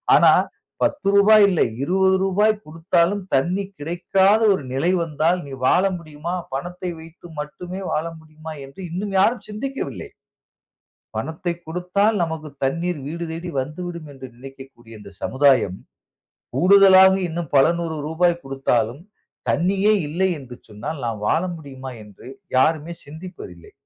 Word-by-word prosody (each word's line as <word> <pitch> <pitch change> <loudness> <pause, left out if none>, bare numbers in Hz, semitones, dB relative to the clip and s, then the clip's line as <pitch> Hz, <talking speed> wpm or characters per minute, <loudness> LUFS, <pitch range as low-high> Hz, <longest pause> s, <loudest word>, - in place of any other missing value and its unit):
ஆனா - - +7 0.5
10 285 -7 0
ரூபாய் 210 +2 +7
இல்லை. 180 -4 +2 0.2
20 190 +4 +3
ரூபாய் 205 +3 +3
கொடுத்தாலும் 170 +4 0
தண்ணீர் 185 +8 0
கிடைக்காத 190 +6 +2
ஒரு 165 - -3
நிலை 155 +7 +1
வந்தால், 165 +2 +1
நீ 140 - -10
வாழ 180 - +4 0.2
முடியுமா? 155 +1 -6 0.2
பணத்தை 180 +6 -4
வைத்து 165 +2 -13
மட்டுமே 175 +5 -6
வாழ 155 - 0
முடியுமா? 155 0 -11
என்று 135 +6 -16
இன்னும் 195 +3 -4
யாரும் 220 +3 +2
சிந்திக்கவில்லை. 265 +6 -5 1.1
பணத்தை 160 +2 -3
கொடுத்தால் 180 +6 +1
நமக்கு 160 -1 -5 0.2
தண்ணீர் 170 +4 -1
வீடு 170 +3 -4
தேடி 170 +2 -5
வந்துவிடும் 165 +3 -6
என்று 130 -1 -9
நினைக்கக்கூடிய 135 -3 -13
இந்த 100 -1 -12
சமுதாயம், 130 -9 +3 0.8
கூடுதலாக 190 0 +7 0.2
இன்னும் 165 -2 -5
பல 135 - +7
100 160 -2 -3
ரூபாய் 170 +2 +1
கொடுத்தாலும், 135 -1 -1 0.5
தண்ணியே 190 - +2 0.2
இல்லை 180 +5 +1
என்று 125 -3 -11
சொன்னால் 110 +8 -6
நாம் 110 -3 -4
வாழ 165 - +2
முடியுமா? 135 -4 -9
என்று 105 +1 -16 0.3
யாருமே 160 +4 +1
சிந்திப்பதில்லை. 155 - -11
165 Hz, 130 wpm, -22 LUFS, 140-185 Hz, 1.1 s, ஆனா